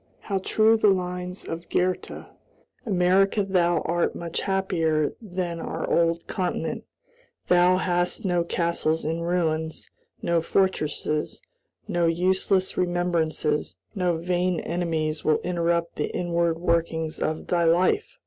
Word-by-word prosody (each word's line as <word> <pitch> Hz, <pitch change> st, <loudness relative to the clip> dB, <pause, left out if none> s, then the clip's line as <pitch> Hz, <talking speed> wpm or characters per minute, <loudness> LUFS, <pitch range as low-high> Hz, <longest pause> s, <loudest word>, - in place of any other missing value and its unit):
How 195 Hz, -2 st, -2 dB
true 220 Hz, +4 st, +3 dB
the 215 Hz, -, +3 dB
lines 180 Hz, -1 st, -1 dB
of 170 Hz, +1 st, -6 dB
Goethe: 185 Hz, 0 st, -1 dB, 0.6 s
"America, 195 Hz, +1 st, +3 dB
thou 175 Hz, -4 st, +2 dB
art 170 Hz, +1 st, 0 dB
much 170 Hz, -1 st, -4 dB
happier 165 Hz, -6 st, 0 dB
than 180 Hz, -5 st, -4 dB
our 165 Hz, 0 st, -4 dB
old 170 Hz, 0 st, +1 dB
continent; 185 Hz, -4 st, -3 dB, 0.6 s
thou 180 Hz, +1 st, +5 dB
hast 175 Hz, +1 st, -1 dB
no 175 Hz, -2 st, +2 dB
castles 170 Hz, -2 st, 0 dB
in 165 Hz, +2 st, -1 dB
ruins, 160 Hz, -2 st, -1 dB, 0.3 s
no 170 Hz, -1 st, +2 dB
fortresses; 155 Hz, -4 st, -1 dB, 0.5 s
no 175 Hz, -1 st, +1 dB
useless 185 Hz, +2 st, +1 dB
remembrances, 170 Hz, -4 st, 0 dB, 0.2 s
no 180 Hz, -5 st, 0 dB
vain 180 Hz, +1 st, 0 dB
enemies 160 Hz, -3 st, -2 dB
will 155 Hz, -1 st, +3 dB
interrupt 170 Hz, -1 st, -1 dB
the 150 Hz, -, 0 dB
inward 170 Hz, -1 st, 0 dB
workings 165 Hz, -2 st, -1 dB
of 155 Hz, 0 st, -2 dB
thy 170 Hz, -1 st, +1 dB
life!" 175 Hz, -, +2 dB
175 Hz, 120 wpm, -25 LUFS, 165-180 Hz, 0.6 s, thou